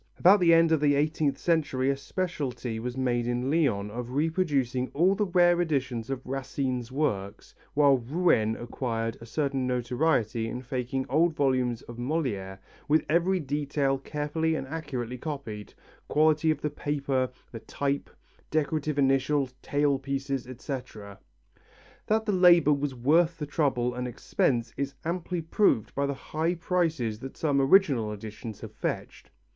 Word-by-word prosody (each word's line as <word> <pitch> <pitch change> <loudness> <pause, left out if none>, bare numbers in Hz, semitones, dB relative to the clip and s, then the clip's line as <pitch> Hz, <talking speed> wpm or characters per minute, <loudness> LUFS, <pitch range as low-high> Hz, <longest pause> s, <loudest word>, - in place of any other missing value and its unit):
About 195 +4 +6
the 175 -2 +5
end 165 0 +5
of 160 - +4
the 145 -1 +3
eighteenth 150 -1 +1
century 140 -6 +1
a - - -1
speciality 135 -6 -3
was 125 +2 -5
made 120 -2 0
in 125 +2 -1
Lyons 120 -11 +1
of 120 +2 -5
reproducing 140 -5 0
all 175 +6 +4
the 205 +1 0
rare 175 -1 +4
editions 135 -7 -1
of 135 -2 -4
Racine's 130 -2 -3
works, 105 -8 -2 0.2
while 140 -2 +5
Rouen 120 -5 +2
acquired 115 -2 -3
a 115 - -10
certain 135 0 -1
notoriety 120 -2 0
in 125 +3 -5
faking 130 +1 -3
old 160 +4 +2
volumes 130 -4 +1
of 120 - -10
Molière 120 -9 -2 0.3
with 150 +1 +3
every 175 +4 +2
detail 140 -2 -1
carefully 150 +3 -1
and 135 -3 -3
accurately 130 -5 -5
copied 125 -9 -6 0.3
quality 155 +1 +3
of 155 -2 0
the 150 - -2
paper, 140 -3 -1 0.2
the 115 - -7
type, 140 +5 -2 0.4
decorative 155 -1 -1
initials, 135 0 +2
tailpieces, 140 -2 -1
etc. 125 -6 -7 0.9
That 220 +1 +1
the 210 - +1
labour 175 -5 +6
was 140 -1 -2
worth 160 +7 +3
the 150 - -4
trouble 135 -5 0
and 125 0 -3
expense 120 -1 -1
is 140 0 -3
amply 175 0 -2
proved 160 - +2
by 140 0 0
the 140 - -2
high 160 +5 -2
prices 165 -10 -1
that 135 +2 -9
some 145 -3 +1
original 135 - +4
editions 105 +1 -8
have - - -8
fetched. - - -5
140 Hz, 150 wpm, -28 LUFS, 125-155 Hz, 0.9 s, About